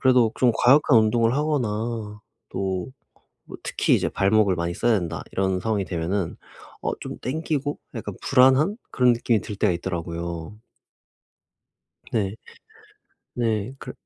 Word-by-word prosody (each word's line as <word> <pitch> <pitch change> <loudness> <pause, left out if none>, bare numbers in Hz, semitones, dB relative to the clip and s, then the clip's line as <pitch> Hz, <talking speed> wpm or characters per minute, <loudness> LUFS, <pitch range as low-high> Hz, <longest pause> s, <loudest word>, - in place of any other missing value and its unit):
그래도 125 -4 +4
좀 125 -2 +4
과격한 135 -1 +5
운동을 115 +2 +3
하거나 115 -7 -2 0.3
또 95 +2 -2 0.8
특히 - - +1
이제 - - 0
발목을 100 -1 +3
많이 85 0 -2
써야 115 +4 +2
된다 85 -2 -4
이런 95 -1 0
상황이 105 -1 0
되면은 90 +1 -2 0.4
어 - - -1
좀 - - -6
당기고? 145 0 -2 0.2
약간 105 -3 -5
불안한? 135 - +4
그런 125 -1 +4
느낌이 115 -2 +1
들 105 - -6
때가 90 - +2
있더라고요. 85 0 -5 1.6
네. 100 -3 0 1.0
네. 115 -1 -1
그 - - -8
110 Hz, 260 characters per minute, -24 LUFS, 95-125 Hz, 1.6 s, 과격한